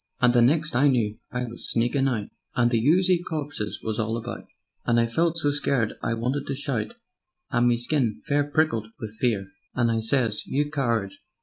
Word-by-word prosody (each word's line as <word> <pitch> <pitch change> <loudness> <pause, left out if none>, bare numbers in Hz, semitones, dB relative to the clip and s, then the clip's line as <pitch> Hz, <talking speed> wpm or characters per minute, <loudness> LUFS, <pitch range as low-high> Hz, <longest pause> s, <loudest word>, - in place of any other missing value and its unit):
"And 125 -1 +4
the 120 - +5
next 150 +5 +3
I 135 +4 +5
knew 115 -6 +1
I 125 0 -2
was 120 -1 -6
sneakin' 120 +4 +1
out, 110 -6 -2 0.3
And 120 -1 +3
the 115 -2 +2
oozy 180 +1 +4
corpses 145 -10 -4
was 110 0 -2
all 110 +1 0
about, 120 +1 -6 0.4
And 120 -1 +3
I 115 - +4
felt 165 +8 +1
so 145 -3 +1
scared 135 -6 0
I 115 - 0
wanted 125 +5 -2
to 140 - -2
shout, 130 -6 -2 0.6
And 120 +1 +3
me 120 -1 +3
skin 120 -2 0
fair 145 0 +2
prickled 145 -8 +1
wiv 110 -4 -5
fear; 105 -6 0 0.3
And 120 -2 +2
I 115 - +1
sez: 115 -2 +1
'You 145 +2 0
coward! 115 -9 0
120 Hz, 195 wpm, -25 LUFS, 115-145 Hz, 0.6 s, the